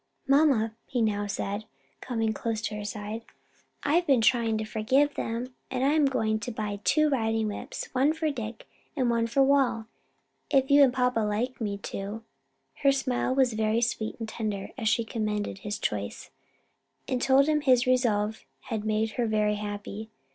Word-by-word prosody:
"Mamma," 270 Hz, -6 st, +4 dB
he 250 Hz, -, -2 dB
now 205 Hz, -2 st, +1 dB
said, 205 Hz, +1 st, -3 dB, 0.4 s
coming 225 Hz, -3 st, -1 dB
close 225 Hz, +1 st, -2 dB
to 220 Hz, -, -3 dB
her 210 Hz, -, -5 dB
side, 210 Hz, +1 st, -5 dB, 0.6 s
"I've 340 Hz, +4 st, +2 dB
been 270 Hz, -4 st, +5 dB
trying 225 Hz, -1 st, +3 dB
to 215 Hz, -, -3 dB
forgive 260 Hz, +7 st, +2 dB
them, 235 Hz, +3 st, -4 dB, 0.2 s
and 255 Hz, 0 st, -1 dB
I'm 295 Hz, +2 st, +4 dB
going 220 Hz, -5 st, 0 dB
to 215 Hz, +3 st, -5 dB
buy 210 Hz, -2 st, -4 dB
two 305 Hz, +6 st, +3 dB
riding 225 Hz, -5 st, 0 dB
whips, 205 Hz, -, -6 dB
one 270 Hz, +4 st, +3 dB
for 320 Hz, -1 st, -1 dB
Dick, 230 Hz, -4 st, -6 dB, 0.3 s
and 255 Hz, -4 st, +1 dB
one 230 Hz, -1 st, +1 dB
for 270 Hz, +4 st, +3 dB
Wal; 265 Hz, -5 st, +2 dB, 0.6 s
if 270 Hz, -1 st, +2 dB
you 285 Hz, +1 st, +7 dB
and 270 Hz, -3 st, +6 dB
papa 250 Hz, -2 st, +1 dB
like 220 Hz, +4 st, -1 dB
me 205 Hz, -2 st, -2 dB
to." 200 Hz, +2 st, -6 dB, 0.6 s
Her 275 Hz, -, +5 dB
smile 260 Hz, -1 st, 0 dB
was 260 Hz, -3 st, +3 dB
very 220 Hz, +1 st, +1 dB
sweet 225 Hz, -2 st, -1 dB
and 225 Hz, -, -5 dB
tender 215 Hz, -3 st, -4 dB
as 225 Hz, -5 st, 0 dB
she 230 Hz, +1 st, +2 dB
commended 210 Hz, -3 st, -3 dB
his 205 Hz, +1 st, -4 dB
choice, 100 Hz, -1 st, -4 dB, 0.8 s
and 250 Hz, -1 st, -1 dB
told 270 Hz, +1 st, +5 dB
him 305 Hz, -1 st, +2 dB
his 255 Hz, -3 st, +4 dB
resolve 220 Hz, -4 st, +1 dB, 0.3 s
had 220 Hz, -2 st, -1 dB
made 220 Hz, 0 st, 0 dB
her 240 Hz, -1 st, -1 dB
very 210 Hz, -1 st, +1 dB
happy. 205 Hz, +1 st, -6 dB
225 Hz, 175 wpm, -28 LUFS, 215-260 Hz, 0.8 s, you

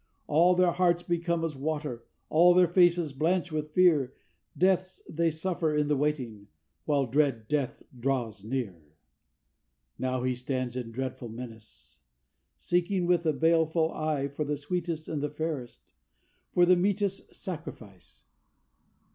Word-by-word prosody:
All 170 Hz, +4 st, +4 dB
their 180 Hz, -1 st, +4 dB
hearts 175 Hz, 0 st, +2 dB
become 170 Hz, -1 st, -1 dB
as 160 Hz, -3 st, -2 dB
water, 145 Hz, -4 st, -4 dB, 0.2 s
all 175 Hz, +3 st, +5 dB
their 180 Hz, -1 st, +6 dB
faces 175 Hz, -3 st, +3 dB
blanch 170 Hz, +5 st, 0 dB
with 155 Hz, -1 st, -3 dB
fear, 160 Hz, -8 st, +4 dB, 0.4 s
Deaths 185 Hz, +1 st, +1 dB
they 165 Hz, +1 st, +1 dB
suffer 160 Hz, -1 st, -1 dB
in 150 Hz, 0 st, +1 dB
the 150 Hz, -, +3 dB
waiting, 130 Hz, -8 st, -2 dB, 0.4 s
while 145 Hz, -3 st, +2 dB
dread 130 Hz, -3 st, +1 dB
Death 145 Hz, -3 st, -2 dB, 0.2 s
draws 120 Hz, -6 st, -2 dB
near. 110 Hz, -7 st, -4 dB, 1.2 s
Now 130 Hz, -1 st, -1 dB
he 130 Hz, 0 st, +1 dB
stands 125 Hz, 0 st, -3 dB
in 125 Hz, -2 st, -4 dB
dreadful 130 Hz, -1 st, -5 dB
menace, 110 Hz, -, -11 dB, 0.6 s
seeking 180 Hz, +1 st, 0 dB
with 175 Hz, -1 st, +2 dB
a 155 Hz, -, +3 dB
baleful 160 Hz, +1 st, +2 dB
eye 150 Hz, -3 st, -1 dB
For 140 Hz, +2 st, -4 dB
the 150 Hz, 0 st, -2 dB
sweetest 165 Hz, +1 st, -3 dB
and 155 Hz, -3 st, -3 dB
the 150 Hz, -, -1 dB
fairest 150 Hz, -5 st, -5 dB, 0.7 s
for 175 Hz, -, +5 dB
the 180 Hz, +1 st, +6 dB
meetest 195 Hz, +1 st, -1 dB
sacrifice. 125 Hz, -, -9 dB
150 Hz, 140 wpm, -28 LUFS, 130-175 Hz, 1.2 s, their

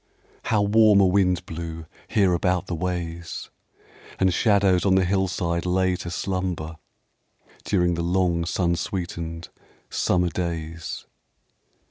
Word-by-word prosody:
How 105 Hz, -2 st, +2 dB
warm 105 Hz, 0 st, +5 dB
a 100 Hz, -, +6 dB
wind 90 Hz, -1 st, +2 dB
blew 80 Hz, -1 st, -6 dB, 0.2 s
here 100 Hz, -5 st, +3 dB
about 90 Hz, +1 st, +1 dB
the 90 Hz, -, -5 dB
ways! 85 Hz, -1 st, -4 dB, 0.7 s
And 95 Hz, -1 st, +2 dB
shadows 100 Hz, -5 st, +3 dB
on 95 Hz, -2 st, +3 dB
the 95 Hz, -1 st, +3 dB
hillside 90 Hz, -2 st, 0 dB
lay 90 Hz, 0 st, +1 dB
to 85 Hz, -, -6 dB
slumber 90 Hz, -3 st, -3 dB, 0.9 s
During 90 Hz, -3 st, +2 dB
the 85 Hz, -, -2 dB
long 85 Hz, -1 st, +1 dB
sun 85 Hz, -1 st, +1 dB
sweetened 85 Hz, -2 st, -4 dB, 0.4 s
summer 90 Hz, -1 st, +1 dB
days. 85 Hz, -2 st, -4 dB
90 Hz, 120 wpm, -24 LUFS, 85-95 Hz, 0.9 s, a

